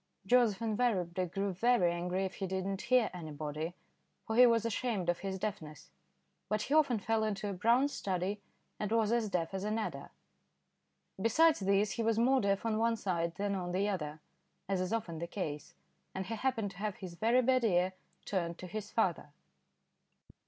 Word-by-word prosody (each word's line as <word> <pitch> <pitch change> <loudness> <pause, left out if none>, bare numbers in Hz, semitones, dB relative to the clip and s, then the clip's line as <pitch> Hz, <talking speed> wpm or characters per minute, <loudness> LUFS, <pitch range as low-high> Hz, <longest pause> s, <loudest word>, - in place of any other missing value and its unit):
Joseph 230 -1 +3
invariably 195 -6 0
grew 195 +3 -2
very 195 -2 +3
angry 180 +2 -1
if 190 - -4
he 195 - -2
did 190 0 -2
not 195 -1 -2
hear 250 -2 +3
anybody, 155 0 -5 0.5
for 220 - -2
he 250 +1 +8
was 230 -1 +3
ashamed 225 -5 -1
of 175 - +1
his 195 -1 -3
deafness; 160 -7 -6 0.6
but 215 +1 0
he 280 - -2
often 285 -6 +4
fell 220 +2 0
into 210 -1 -2
a 200 - -2
brown 235 +9 +3
study 200 -5 -2 0.4
and 210 0 -2
was 225 -1 +2
as 235 -3 +1
deaf 170 -2 -1
as 190 0 -3
an 215 +1 -1
adder. 170 -11 -4 1.1
Besides 310 +9 +4
this 200 +1 +2
he 235 - -2
was 225 -1 +1
more 260 +3 +4
deaf 200 +1 0
on 220 -1 +1
one 230 0 +2
side 170 -5 -2
than 200 +2 -1
on 180 -2 -3
the 195 +3 +1
other, 155 -6 -3 0.5
as 190 -1 0
is 185 - -2
often 190 -8 -2
the 170 - -4
case, 155 -6 -5 0.4
and 190 0 -3
he 220 - -4
happened 225 -3 -1
to 195 - -15
have 210 0 -2
his 185 -3 -8
very 230 +7 +3
bad 255 0 +3
ear 185 -3 +2 0.3
turned 170 -3 -2
to - - -8
his 210 +3 -5
father. 180 -10 0
200 Hz, 190 wpm, -33 LUFS, 180-225 Hz, 1.1 s, he